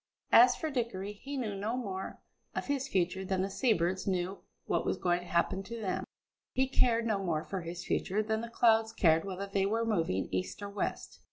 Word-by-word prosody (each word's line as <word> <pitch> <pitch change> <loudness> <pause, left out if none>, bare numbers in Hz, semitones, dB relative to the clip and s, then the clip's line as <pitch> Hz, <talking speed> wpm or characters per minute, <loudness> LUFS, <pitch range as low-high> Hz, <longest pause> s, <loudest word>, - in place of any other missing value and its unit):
As 245 +1 +8
for 315 - -3
Dickory, 215 -6 -2
he 275 +7 -6
knew 225 -6 -2
no 210 +5 -2
more 195 -6 -5 0.3
of - - -2
his 280 -1 -1
future 185 -3 0
than 190 0 0
the 195 - -3
sea 250 +4 +2
birds 185 -1 0
knew 185 0 -1 0.3
what - - +1
was - - 0
going 175 -1 +1
to 180 - -10
happen 175 +3 +1
to 230 +4 -7
them; 195 -4 -2 0.5
he 265 +1 +2
cared 235 -3 +3
no 210 -3 0
more 160 -4 0
for 190 -2 -4
his 170 +1 -6
future 210 +3 0
than 220 0 -1
the 235 - -6
clouds 225 -1 +3
cared 165 -1 +4
whether 195 0 -4
they 195 0 0
were 225 +3 0
moving 165 - 0
east 95 - -3
or 200 - -4
west. 200 - -4
200 Hz, 210 wpm, -32 LUFS, 185-230 Hz, 0.5 s, As